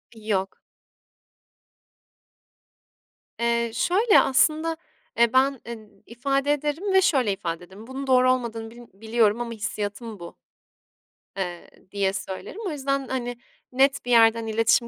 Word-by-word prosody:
Yok. 205 Hz, -3 st, -2 dB, 2.8 s
Eee, 235 Hz, 0 st, +1 dB
şöyle 400 Hz, -, +4 dB
aslında, 315 Hz, +4 st, +2 dB, 0.4 s
eee, 235 Hz, 0 st, +4 dB
ben, 265 Hz, +1 st, +3 dB
eee, 225 Hz, -3 st, -9 dB, 0.2 s
ifade 275 Hz, +4 st, -1 dB
ederim 300 Hz, +7 st, -2 dB
ve 380 Hz, -, +6 dB
şöyle 255 Hz, -, +2 dB
ifade 170 Hz, -2 st, -5 dB
ederim; 195 Hz, +5 st, -13 dB
"Bunun 270 Hz, +1 st, -6 dB
doğru 255 Hz, -1 st, +5 dB
olmadığını 230 Hz, -3 st, -3 dB
bilm 240 Hz, 0 st, -13 dB
biliyorum 220 Hz, +2 st, +1 dB
ama 235 Hz, -1 st, -4 dB
hissiyatım 215 Hz, 0 st, -5 dB
bu." 170 Hz, 0 st, -10 dB, 1.0 s
eee, 175 Hz, -3 st, -5 dB, 0.2 s
diye 195 Hz, -1 st, 0 dB
söylerim. 195 Hz, -, -6 dB
O -, -, -2 dB
yüzden, 275 Hz, -2 st, -2 dB
hani, 245 Hz, -2 st, -3 dB, 0.3 s
net 270 Hz, +1 st, +2 dB
bir 245 Hz, -, -2 dB
yerden 225 Hz, -1 st, +5 dB
iletişim 225 Hz, +2 st, +2 dB
235 Hz, 125 wpm, -24 LUFS, 220-270 Hz, 2.8 s, ve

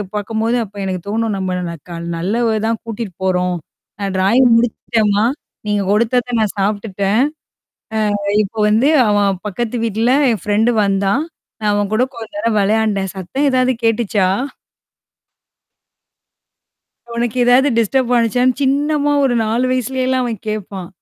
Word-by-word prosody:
பாக்கும்போது 225 Hz, +3 st, -1 dB
அப்ப 205 Hz, 0 st, -19 dB
எனக்கு 185 Hz, -2 st, -3 dB
தோணும். 225 Hz, +1 st, -1 dB
நம்ம 185 Hz, -1 st, -2 dB
ந 170 Hz, -, -5 dB, 0.2 s
க 170 Hz, -, -6 dB, 0.2 s
நல்ல 205 Hz, +8 st, -1 dB, 0.2 s
தான் 225 Hz, -1 st, -1 dB
கூட்டிட்டு 225 Hz, -4 st, -6 dB
போறோம். 180 Hz, -1 st, +1 dB, 0.5 s
நான் 195 Hz, -1 st, -2 dB
ட்ராயிங் 235 Hz, +7 st, +4 dB
முடிச்சுட்டேம்மா! 220 Hz, -2 st, +1 dB, 0.4 s
நீங்க 205 Hz, -1 st, +1 dB
கொடுத்தத 235 Hz, +3 st, +1 dB
நான் 215 Hz, -1 st, -1 dB
சாப்ட்டுட்டேன். 200 Hz, 0 st, 0 dB, 1.1 s
அ -, -, +2 dB
இப்போ 210 Hz, +3 st, -9 dB
வந்து 225 Hz, +7 st, +3 dB, 0.2 s
அவன் 200 Hz, -3 st, +1 dB
பக்கத்து 240 Hz, +4 st, -3 dB
வீட்ல 225 Hz, +3 st, +1 dB, 0.2 s
என் 215 Hz, -7 st, -2 dB
ஃப்ரெண்ட் 215 Hz, +3 st, +2 dB
வந்தான். 200 Hz, +8 st, +1 dB, 0.4 s
நான் 210 Hz, -1 st, +1 dB
அவன் 205 Hz, -1 st, 0 dB
கூட 240 Hz, +4 st, +3 dB
கொஞ்ச 225 Hz, -1 st, -8 dB
நேரம் 230 Hz, -6 st, +1 dB
விளையாண்டேன். 205 Hz, -2 st, +1 dB
சத்தம் 265 Hz, +11 st, -1 dB
ஏதாவது 255 Hz, 0 st, +2 dB
கேட்டுச்சா? 215 Hz, -4 st, +1 dB, 2.9 s
உனக்கு 235 Hz, 0 st, -1 dB
ஏதாவது 250 Hz, +3 st, +5 dB
டிஸ்டர்ப் 245 Hz, +3 st, +1 dB
ஆனுச்சான்னு 245 Hz, +2 st, +2 dB
சின்னமா 290 Hz, +2 st, +1 dB
ஒரு 250 Hz, -3 st, +2 dB
4 225 Hz, +3 st, 0 dB
வயசுலேயலாம் 255 Hz, +1 st, 0 dB
அவன் 230 Hz, -4 st, -5 dB
கேட்பான். 195 Hz, -4 st, -5 dB
220 Hz, 130 wpm, -17 LUFS, 200-245 Hz, 2.9 s, ஏதாவது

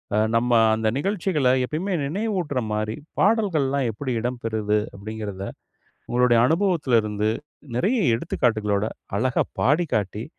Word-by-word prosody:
அ -, -, +2 dB, 0.2 s
நம்ம 120 Hz, +1 st, +2 dB, 0.2 s
அந்த 110 Hz, 0 st, -1 dB
நிகழ்ச்சிகள 180 Hz, -5 st, 0 dB, 0.2 s
எப்பயுமே 175 Hz, +9 st, -3 dB
நினைவூட்டுற 175 Hz, -, -1 dB
மாரி, 110 Hz, +1 st, -2 dB, 0.2 s
பாடல்கள்லாம் 155 Hz, -, +2 dB
எப்படி 130 Hz, +4 st, -4 dB
இடம்பெறுது?" 110 Hz, -3 st, -1 dB, 0.2 s
அப்படிங்கிறத, 100 Hz, -1 st, -6 dB, 0.7 s
உங்களுடைய 120 Hz, -1 st, +4 dB
அனுபவத்தலிருந்து, 125 Hz, -, +1 dB, 0.5 s
நிறைய 220 Hz, -, +2 dB, 0.2 s
எடுத்துக்காட்டுகளோட, 110 Hz, -3 st, 0 dB, 0.3 s
அழகா 125 Hz, +3 st, +1 dB, 0.2 s
பாடிக்காட்டி, 115 Hz, -, +1 dB
125 Hz, 100 wpm, -24 LUFS, 110-165 Hz, 0.7 s, உங்களுடைய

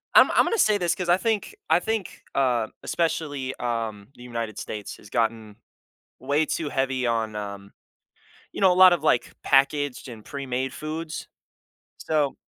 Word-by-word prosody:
I'm -, -, +8 dB
I'm -, -, +4 dB
gonna 460 Hz, -, 0 dB
say 215 Hz, -, +4 dB
this, 175 Hz, -4 st, 0 dB
'cause 180 Hz, -2 st, -4 dB
I 175 Hz, -, +6 dB
think 220 Hz, -, -1 dB, 0.2 s
I -, -, +5 dB
think, 220 Hz, -4 st, -3 dB
um, 125 Hz, -5 st, +1 dB
especially, 145 Hz, -5 st, -2 dB
um, 115 Hz, -4 st, -3 dB
the 120 Hz, -, -13 dB
United 115 Hz, -3 st, -5 dB
States 105 Hz, -2 st, -6 dB
has 100 Hz, -, -15 dB
gotten 110 Hz, -2 st, -1 dB, 0.6 s
way 150 Hz, +2 st, +1 dB
too 155 Hz, -1 st, -2 dB
heavy 135 Hz, -2 st, 0 dB
on, 110 Hz, -2 st, -1 dB
um, 100 Hz, -1 st, -6 dB, 0.8 s
you -, -, -6 dB
know, 190 Hz, -2 st, +6 dB
a -, -, +2 dB
lot 185 Hz, 0 st, +8 dB
of, 170 Hz, -4 st, 0 dB
like, 140 Hz, -6 st, +2 dB
packaged 140 Hz, 0 st, +2 dB
and 115 Hz, -3 st, -9 dB
premade 130 Hz, -2 st, -3 dB
foods, 155 Hz, +2 st, -5 dB, 0.7 s
so 150 Hz, -3 st, 0 dB
135 Hz, 165 wpm, -25 LUFS, 115-160 Hz, 0.8 s, I'm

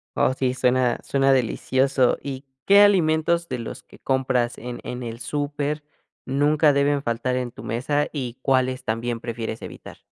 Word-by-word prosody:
Oh 130 Hz, -, +2 dB
sí, 130 Hz, -1 st, 0 dB
suena 125 Hz, -1 st, +1 dB
suena 135 Hz, 0 st, +2 dB
delicioso, 130 Hz, +1 st, +2 dB
¿y 135 Hz, 0 st, -6 dB, 0.2 s
qué 200 Hz, +1 st, +7 dB
alimentos 170 Hz, -3 st, +3 dB
de 125 Hz, -2 st, -4 dB
los 115 Hz, -, -7 dB
que -, -, -18 dB
compras 130 Hz, -2 st, 0 dB
en 120 Hz, +1 st, -7 dB
en 125 Hz, 0 st, -5 dB
el 115 Hz, 0 st, -6 dB
súper, 145 Hz, +3 st, -2 dB, 0.4 s
nunca 145 Hz, +2 st, +3 dB
deben 140 Hz, 0 st, +2 dB
faltar 125 Hz, +1 st, -1 dB
en 125 Hz, -1 st, -3 dB
tu 110 Hz, -, -11 dB
mesa 125 Hz, +6 st, -1 dB
y 125 Hz, -4 st, -5 dB
cuáles 130 Hz, -1 st, +1 dB
también 115 Hz, 0 st, -2 dB
prefieres 115 Hz, -2 st, -5 dB
evitar? -, -, -10 dB
130 Hz, 160 wpm, -23 LUFS, 120-145 Hz, 0.4 s, qué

